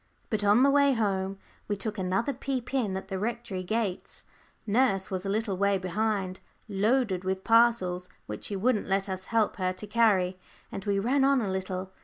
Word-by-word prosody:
But 215 -2 0
on 205 +5 +5
the 275 - +5
way 280 -1 +4
home 195 -4 -1 0.3
we 205 - 0
took 210 +1 -4
another 190 +9 0
peep 260 -1 -4
in 215 -8 0
at 190 - -7
the 190 -1 -3
Rectory 230 -3 -3
gates. 200 0 -3 0.4
Nurse 205 -4 +1
was 190 +1 -3
a - - -1
little 210 -1 -1
way 200 0 +2
behind, 190 0 -1 0.3
loaded 210 -1 +1
with 190 0 -2
parcels 225 -6 +3 0.2
which 105 - -6
she 205 - -3
wouldn't 215 +2 +1
let 195 +1 +1
us 190 -1 -4
help 225 -2 +1
her 185 -1 0
to 185 +3 -7
carry; 200 -4 +2 0.3
and 195 - -5
we 200 -1 +1
ran 255 +7 +2
on 275 0 +4
a 205 -5 -1
little. 190 0 -4
200 Hz, 190 wpm, -28 LUFS, 190-230 Hz, 0.4 s, on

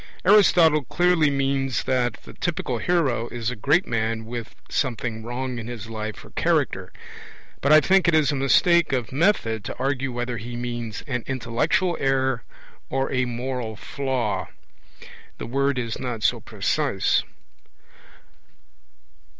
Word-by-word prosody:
Aristotle 175 -6 +6
clearly 175 -2 +3
means 135 -2 0
that 125 -3 +1
the - - -12
typical 145 -8 -2
hero 135 -10 +1
is 120 0 -3
a - - -5
great 145 - +2
man 110 -2 -1
with 115 -1 -6
'something 115 -3 -2
wrong' 125 +1 -4
in 115 - -7
his 115 -2 -7
life 110 -1 -5
or - - -15
character; - - 0 0.7
but 140 - +2
I 155 0 +8
think 190 +3 +3
it 170 - +4
is 155 -1 +3
a - - -1
mistake 160 +4 +3
of 125 -4 -1
method 130 - +1
to - - -5
argue 135 0 -1
whether 120 0 -3
he 120 +3 -7
means 120 -2 -4
'an 125 -5 -3
intellectual 135 - 0
error' 130 -2 +1 0.5
or 135 0 -1
'a 130 -1 +1
moral 125 -2 -4
flaw'. 120 -6 -2 0.9
The - - -6
word 140 +2 0
is 115 -3 -3
not 120 -4 -4
so - - +2
precise. - - 0
130 Hz, 140 wpm, -24 LUFS, 115-140 Hz, 0.9 s, I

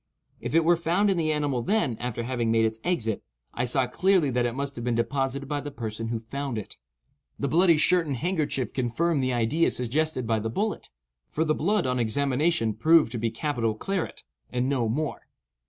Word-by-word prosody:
If - - -4
it 165 -1 +4
were 175 +1 +5
found 175 +5 +2
in 190 - 0
the 155 -2 +1
animal 145 -5 0
then, 170 - +1
after 120 -1 -3
having 120 -1 -1
made 115 0 +3
its 110 0 -2
exit, 115 - 0 0.3
I 120 - -1
saw 130 +1 +2
clearly 180 +3 +2
that 120 0 +1
it 120 - -4
must 140 0 -3
have 120 - -6
been 120 -1 0
deposited 135 +3 -1
by 145 0 -2
the 145 - -5
person 115 -4 -5
who 115 -1 -3
found 135 +2 -4
it. 105 - -7 0.6
The 140 - -1
bloody 170 +3 +4
shirt 165 +2 +3
and 140 -3 -2
handkerchief 150 - -1
confirmed 140 +5 0
the 130 0 0
idea 120 +7 +2
suggested 130 +2 -1
by 110 -1 +1
the 110 +1 -3
bullet; 210 - -2 0.4
for 160 - 0
the 155 - +2
blood 200 +6 +1
on 125 -1 0
examination 135 +1 +1
proved 155 +4 +4
to 120 - -3
be 115 +1 0
capital 115 -2 -1
claret, 195 - -3 0.3
and 125 +1 0
no 130 -5 0
more. 150 +6 -3
135 Hz, 205 wpm, -26 LUFS, 115-160 Hz, 0.6 s, were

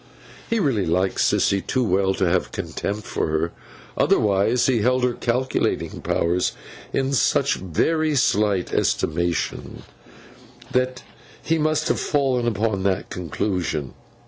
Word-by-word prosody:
He 230 - +1
really 130 - +1
liked 90 +3 0
Sissy 100 -1 +2
too 130 +5 -1
well 95 -2 +1
to 95 - +1
have 90 +1 +1
a - - -22
contempt 105 +1 -4
for - - -2
her; 80 +2 -1 0.4
otherwise 100 +4 +2
he 125 -3 +2
held 125 +3 +2
her 125 -1 +2
calculating 125 +2 -1
powers 85 +2 0 0.4
in 135 0 0
such 130 - +2
very 155 - 0
slight 105 -7 +1
estimation 85 0 -1 0.9
that 130 0 0 0.4
he 165 0 +1
must 155 0 +1
have - - +1
fallen 130 -5 +1
upon 110 -2 0
that 95 -1 -1
conclusion. 85 -5 -2
105 Hz, 130 wpm, -23 LUFS, 90-130 Hz, 0.9 s, Sissy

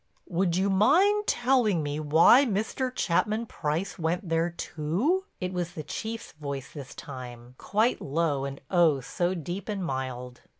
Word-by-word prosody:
"Would 175 -1 0
you 195 +1 +2
mind 375 - +4
telling 240 - +2
me 145 +1 -3
why 160 - +6
Mr. 235 +3 -1
Chapman 215 +1 0
Price 170 0 -3
went 175 +4 -1
there 165 +1 +1
too?" 175 - -1
It 185 0 -3
was 175 -1 -3
the 155 - -6
Chief's 225 +8 -5
voice 140 -3 -6
this 140 -4 -9
time, 125 -3 -9
quite 220 +4 +1
low 145 -1 0
and 140 0 -5
oh, 165 -7 +4
so 175 +7 -1
deep 175 +5 -5
and 195 -3 -2
mild. 125 -3 -4
175 Hz, 155 wpm, -27 LUFS, 145-210 Hz, -, why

